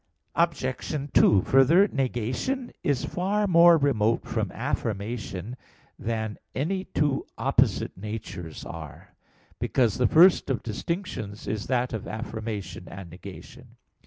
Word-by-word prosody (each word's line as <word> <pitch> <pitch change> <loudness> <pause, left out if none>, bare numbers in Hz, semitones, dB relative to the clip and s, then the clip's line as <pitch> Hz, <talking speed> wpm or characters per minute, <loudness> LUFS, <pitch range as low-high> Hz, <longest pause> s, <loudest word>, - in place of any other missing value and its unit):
Obj. 150 -4 0 0.2
2: 100 -3 +6
Further, 160 +10 +5
negation 135 - -2
is 140 -4 0
far 200 +4 0
more 170 -2 +7
remote 115 -6 +1
from - - -2
affirmation 105 0 -3 0.4
than 110 -1 -3 0.2
any 185 +7 -1
two 145 -3 0
opposite - - +1
natures 100 -5 -7
are; 80 -4 -9 0.5
because 120 -3 +1
the 125 - +4
first 175 +1 +6
of 130 - -1
distinctions 110 - -4
is 105 0 -3
that 125 -1 0
of 110 - -4
affirmation 110 -2 -5
and 95 -3 -9
negation. 90 - -11
120 Hz, 115 wpm, -26 LUFS, 105-160 Hz, 0.5 s, more